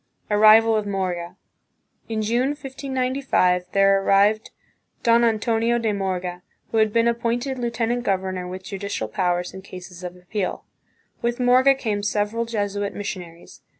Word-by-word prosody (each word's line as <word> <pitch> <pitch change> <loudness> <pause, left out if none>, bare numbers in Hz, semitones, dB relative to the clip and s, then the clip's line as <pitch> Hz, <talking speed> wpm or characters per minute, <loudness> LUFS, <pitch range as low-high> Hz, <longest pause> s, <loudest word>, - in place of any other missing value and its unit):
Arrival 215 +2 +6
of 210 -1 -1
Morga. 180 -3 -3 0.7
In 220 -1 -1
June, 245 +6 +1
1595, 260 -9 0
there 195 0 +4
arrived 205 +3 +3 0.5
Don 235 0 +4
Antonio 230 +1 +1
de 225 -2 0
Morga, 180 -2 -3 0.3
who 225 - 0
had 220 -1 +3
been 230 +1 +2
appointed 240 +3 -1
lieutenant 235 0 -1
governor 185 -3 -2
with 185 +1 -7
judicial 195 - -4
powers 180 - -1
in 190 - -8
cases 180 -1 -11
of 180 0 -6
appeal. 180 +1 -4 0.6
With 235 +1 -1
Morga 255 +2 +5
came 215 -6 -2
several 210 +3 -1
Jesuit 205 -3 -2
missionaries. 180 -4 -7
210 Hz, 135 wpm, -23 LUFS, 185-235 Hz, 0.7 s, Arrival